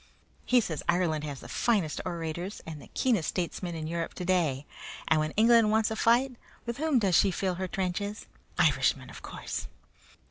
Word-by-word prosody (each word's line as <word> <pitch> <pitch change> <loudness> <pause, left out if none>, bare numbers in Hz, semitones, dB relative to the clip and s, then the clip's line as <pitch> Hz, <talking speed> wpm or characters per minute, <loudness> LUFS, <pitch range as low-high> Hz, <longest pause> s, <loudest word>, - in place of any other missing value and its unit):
He 250 -1 +5
says 160 -8 -3
Ireland 170 -3 +2
has 140 -3 -6
the - - -10
finest 200 -10 0
orators 170 +2 -4
and 155 -2 -7
the - - -13
keenest 230 - +2
statesmen 175 -1 -3
in 160 -1 -4
Europe 165 +1 -3
today, 170 -7 0 0.4
and 155 - +4
when 155 0 0
England 230 0 +6
wants 220 0 +3
to 220 - -2
fight, 240 +3 +3 0.3
with 235 0 -3
whom 310 -2 +2
does 195 -6 +2
she 195 - +5
fill 190 0 -1
her 185 - -1
trenches? 195 +2 -3 0.3
Irishmen, 135 -5 +2
of - - -11
course! - - -5
180 Hz, 175 wpm, -29 LUFS, 160-220 Hz, 0.4 s, England